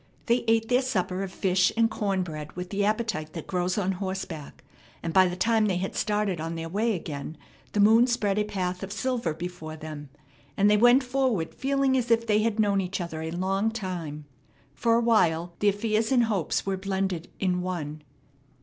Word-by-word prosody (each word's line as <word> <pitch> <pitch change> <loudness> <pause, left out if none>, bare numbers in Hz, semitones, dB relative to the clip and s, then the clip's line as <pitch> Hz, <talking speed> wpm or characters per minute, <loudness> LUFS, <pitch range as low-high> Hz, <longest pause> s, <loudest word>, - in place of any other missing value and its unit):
They 240 +1 +2
ate 225 0 +3
their 250 +2 +3
supper 190 -7 -1
of 195 -1 -4
fish 185 -1 +2
and 230 0 +5
corn 195 -4 -1
bread 155 -3 -7
with 180 0 -6
the 205 0 0
appetite 210 -7 -1
that 165 - -6
grows 180 0 -1
on 195 -2 +1
horseback, 185 -5 -5 0.4
and 165 -1 -3
by 185 -1 +6
the 180 - -3
time 220 +3 +2
they 185 -3 +1
had 190 +2 -3
started 210 -5 0
on 165 +1 -4
their 165 0 -5
way 215 +5 +1
again 155 -2 -6 0.4
the 210 - +2
moon 225 +4 +6
spread 210 -5 +1
a - - +2
path 185 -3 -3
of 195 0 -6
silver 240 -4 -1
before 170 -2 -6
them, 155 -2 -8 0.5
and 205 +1 +4
they - - +6
went 245 +5 +6
forward 250 -9 0
feeling 275 0 +1
as 250 -2 0
if 230 0 +3
they 210 -2 +3
had 220 0 0
known 200 -2 +3
each 185 +1 -3
other 170 -3 -4
a 160 - -3
long 190 +5 0
time. 175 -9 -5 0.5
For 230 +10 +2
a 235 - +3
while 175 -7 +2
their 205 -1 +4
fears 215 +2 0
and 250 -2 +5
hopes 205 -8 -1
were 195 -1 -1
blended 190 -3 -2
in 180 -2 0
one. 155 -5 -4
195 Hz, 200 wpm, -27 LUFS, 175-225 Hz, 0.5 s, by